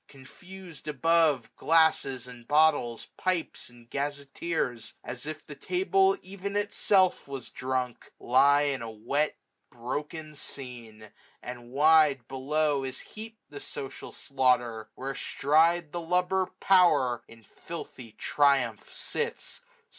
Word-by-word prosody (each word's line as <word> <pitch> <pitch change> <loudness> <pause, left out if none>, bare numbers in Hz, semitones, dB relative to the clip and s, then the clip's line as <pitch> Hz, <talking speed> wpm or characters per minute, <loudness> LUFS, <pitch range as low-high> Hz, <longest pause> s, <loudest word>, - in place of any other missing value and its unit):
Confus'd 175 +5 -12
above^ 155 -2 +3
Glasses 160 -6 +3
and 120 -2 -12
bottles, 145 -6 +3
pipes 185 -7 -2
and 120 -1 -18
gazetteers, 140 -3 -3
As 125 +3 -7
if 155 0 -6
the 150 - -9
table 385 - +2
ev'n 200 +1 -6
itself 200 -4 +2
was 135 -2 -7
drunk. 130 -1 -3
Lie 140 +3 +5 0.2
a 115 -1 -6
wet 125 +8 -1 0.3
broken 150 +6 -5
scene; 120 -7 -7 0.3
and 120 -1 -8
wide, 145 -2 +4
below, 145 +2 0
560 135 -1 -3
Is 130 - -10
heap'd 220 +1 -9
the 145 -1 -8
social 135 -1 -6
slaughter: 120 -5 0
where 135 +1 -4
astride 160 +4 +2
The 175 - -3
lubber 180 +2 +1
Power 175 -11 +4
in 115 -1 -16
filthy 125 -3 -9
triumph 135 -6 +1
sits. 465 +1 -4
145 Hz, 115 wpm, -28 LUFS, 125-165 Hz, 0.3 s, Lie